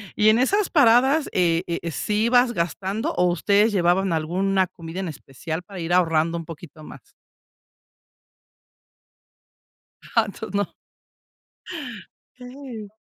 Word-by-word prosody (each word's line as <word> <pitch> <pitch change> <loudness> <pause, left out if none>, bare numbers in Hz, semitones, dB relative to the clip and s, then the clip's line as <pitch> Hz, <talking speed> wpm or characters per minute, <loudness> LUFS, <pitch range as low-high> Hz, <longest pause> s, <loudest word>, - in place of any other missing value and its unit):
y 210 - +3
en 225 +2 +4
esas 400 +10 +2
paradas, 270 +1 +4
eh 170 -1 +1
eh, 170 -1 -3
¿sí 210 +7 -1
ibas 245 0 +4
gastando 190 +5 -2
o 180 - +2
ustedes 200 +5 +2
llevaban 185 0 +2
alguna 185 +4 0
comida 165 +2 -9
en 190 - -3
especial 160 +3 -6
para 190 -1 -10
ir 170 +1 -2
ahorrando 165 -1 +2
un 165 - -5
poquito 155 -1 -11
más? - - -13 2.9
Ja 230 -2 +1
entoces 205 0 -8
no. 200 -2 -1 1.7
Okey. 250 -4 -9
190 Hz, 120 wpm, -23 LUFS, 170-220 Hz, 2.9 s, en